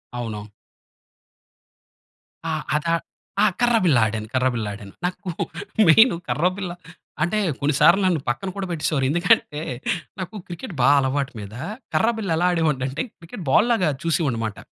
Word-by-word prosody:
అవును. 110 -3 -5 2.0
ఆ! - - -1 0.2
అదా, 165 +2 +1 0.5
ఆ! - - +7 0.2
కర్ర 240 -1 +4
బిల్ల 145 -8 +5
ఆడాను. 110 0 -3
కర్ర 130 0 +2
బిల్ల 115 -3 -2
ఆడాను. 100 -1 -10
నాకు 185 +1 -4 0.6
మెయిను 225 +7 +7
కర్రబిల్ల 180 +2 0 0.5
అంటే, 175 +6 0 0.2
కొన్ని 145 +1 +1
సార్లు 170 +6 +6
నన్ను 175 -5 +2
పక్కన 185 +11 -2
కూడా 195 -1 -3
పెట్టేసేవారు. 150 -4 0
ఎందుకంటే, 170 -3 +2 0.6
నాకు 185 +4 -5
క్రికెట్ 175 +3 -7
బా 135 - +6
అలవాటు 135 0 0
మీద. 100 0 -8 0.4
కర్రబిల్ల 220 -3 +1
ఎలా 180 +1 +2
ఆడేవాడినంటే, 150 -5 0 0.2
క్రికెట్ 175 +3 -9
బాల్ 215 - +5
లాగా 185 -8 +3
చూసీవాడినిమాట. 125 - -1
160 Hz, 135 wpm, -23 LUFS, 130-185 Hz, 2.0 s, ఆ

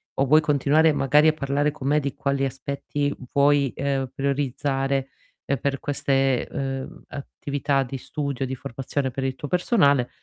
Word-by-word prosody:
o 135 - +2
vuoi 155 +4 +5
continuare 150 +2 +3
magari 150 +2 +4
a 155 - +5
parlare 145 0 0
con 140 -3 -6
me 150 +1 +3
di 140 -1 -3
quali 140 0 0
aspetti 140 +2 -3 0.2
vuoi, 140 -2 +3
uhm, 135 -1 -1
prioritizzare, 135 0 -1 0.4
ehm, 140 - 0
per 135 +2 -2
queste, 135 -2 +1
uhm, 135 -1 -4
attività 140 0 -2
di 130 +1 -6
studio, 140 0 -3
di 130 0 -4
formazione 130 +2 -3
per 135 - -4
il 130 -1 -1
tuo 145 - -6
personale, 145 - +3
140 Hz, 160 wpm, -24 LUFS, 135-145 Hz, 0.4 s, vuoi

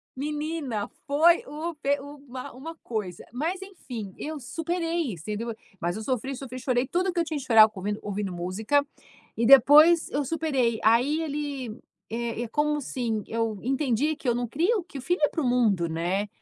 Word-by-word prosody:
Menina, 295 -5 -3 0.2
foi 320 +5 +4
o 315 +4 -5
pe 285 -1 0
o 285 +1 -9
uma 255 -1 -7
uma 310 +7 -8
coisa, 205 -7 -4
mas 335 +9 -2
enfim, 245 - -8
eu 310 0 -5
superei 330 - -2
isso, 165 -3 -10
entendeu, 225 +2 -3 0.3
mas 175 +2 -1
eu 220 - -5
sofri, 260 +3 -2
sofri, 255 -1 -7
chorei 255 0 0
tudo 370 +2 0
o - - -1
que 345 - -1
eu 335 - +3
tinha 310 -2 -3
de 270 - -6
chorar 220 -3 +7
com 205 - -10
ouvindo 205 +2 -2
ouvindo 200 -2 -3
música 210 +11 0 0.5
e 230 - 0
depois 295 +6 +7
eu 290 0 -1
superei. 270 -7 0
Aí 250 +8 +3
ele, 285 -4 -3 0.4
eh, 230 0 -3
é 240 - -4
como 300 +4 +1
assim, 235 -6 -2
eu 225 -3 -2
entendi 270 +3 +1
que 275 - -8
eu 240 - +4
não 245 0 -2
crio 355 - +1
que 280 - -8
filho 355 +5 -1
é - - +5
para 320 - -3
o 270 - -1
mundo, 210 -9 +2
né? 175 +5 -1
265 Hz, 195 wpm, -26 LUFS, 225-305 Hz, 0.5 s, chorar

